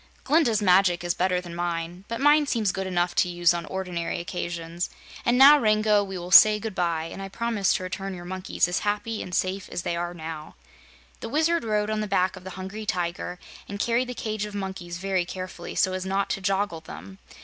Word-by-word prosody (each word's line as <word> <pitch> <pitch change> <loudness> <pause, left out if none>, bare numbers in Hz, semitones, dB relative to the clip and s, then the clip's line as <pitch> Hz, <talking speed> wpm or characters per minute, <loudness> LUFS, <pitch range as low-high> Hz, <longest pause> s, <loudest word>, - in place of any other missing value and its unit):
"Glinda's 260 -8 +2
magic 180 -2 +4
is 175 0 0
better 180 0 +1
than 175 -1 -9
mine, 175 +1 -4
but 230 0 -4
mine 295 +1 +4
seems 220 -7 +1
good 190 +1 -4
enough 175 -1 0
to 180 - +2
use 175 -1 +3
on 170 -1 -4
ordinary 180 -3 -3
occasions. 170 -1 -4 0.4
And 240 +1 +4
now, 285 +3 +9
Rango, 215 -2 +3
we 190 -1 -6
will 175 +1 -7
say 210 +4 +9
good 220 0 -5
bye, 170 -3 0
and - - -8
I 195 - -6
promise 220 -2 0
to - - -3
return 190 +1 -5
your 175 -1 -9
monkeys 185 -1 -1
as 180 - -1
happy 210 +2 -2
and 180 - -5
safe 190 +1 -1
as 175 - -4
they 170 - -1
are 175 +1 -3
now." 160 -2 -7 0.6
The - - -6
Wizard 320 +4 +1
rode 210 -1 0
on 215 - -1
the 210 - -2
back 185 -1 +1
of - - -12
the 190 0 -8
Hungry 200 +3 -6
Tiger 175 0 -2 0.3
and 200 0 -5
carried 240 +3 +1
the 250 - -5
cage 215 -2 -3
of 210 -1 -8
monkeys 190 -3 -5
very 190 -1 0
carefully, 185 -1 -7
so 185 - +2
as 185 0 -3
not 195 +1 -1
to 195 - -2
joggle 195 -3 -1
them. 95 - -10
190 Hz, 215 wpm, -25 LUFS, 175-210 Hz, 0.6 s, now